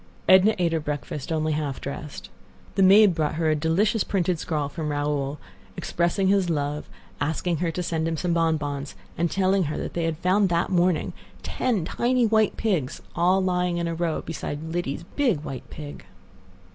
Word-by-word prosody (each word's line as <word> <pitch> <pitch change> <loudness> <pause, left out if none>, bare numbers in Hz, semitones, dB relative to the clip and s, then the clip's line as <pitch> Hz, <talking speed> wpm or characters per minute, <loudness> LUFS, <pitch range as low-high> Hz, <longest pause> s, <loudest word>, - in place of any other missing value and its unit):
Edna 190 +4 +6
ate 175 -2 +1
her 165 - +1
breakfast 150 0 -5
only 155 -1 0
half 150 -3 -2
dressed. 140 +1 -7 0.4
The - - +1
maid 195 +1 +7
brought 155 -2 -1
her 160 -1 +1
a - - +2
delicious 190 +8 +1
printed 180 -3 0
scrawl 150 -3 -1
from 150 +1 -4
Raoul, 145 -1 -1 0.4
expressing 175 +3 0
his 195 -2 +3
love, 150 -1 -2 0.3
asking 160 +3 -1
her 170 +2 0
to 180 +2 -3
send 165 -1 -1
him 165 -1 -1
some 175 +1 0
bonbons, 150 -4 -1 0.2
and 170 +1 0
telling 190 0 +2
her 150 - -3
they 170 -1 -2
had 165 -1 -1
found 185 +3 +2
that 170 +1 +1
morning 175 -2 +2 0.3
ten 225 -10 -1
tiny 245 +6 +1
white 220 -1 +2
pigs 170 - -1 0.2
all 185 +3 +3
lying 180 -1 0
in 170 0 -1
a 170 - -2
row 165 -1 -1
beside 160 0 -5
Lidie's 170 -3 -2
big 240 - +2
white 135 -3 -7
pig. 145 -1 -9
170 Hz, 175 wpm, -25 LUFS, 150-185 Hz, 0.4 s, maid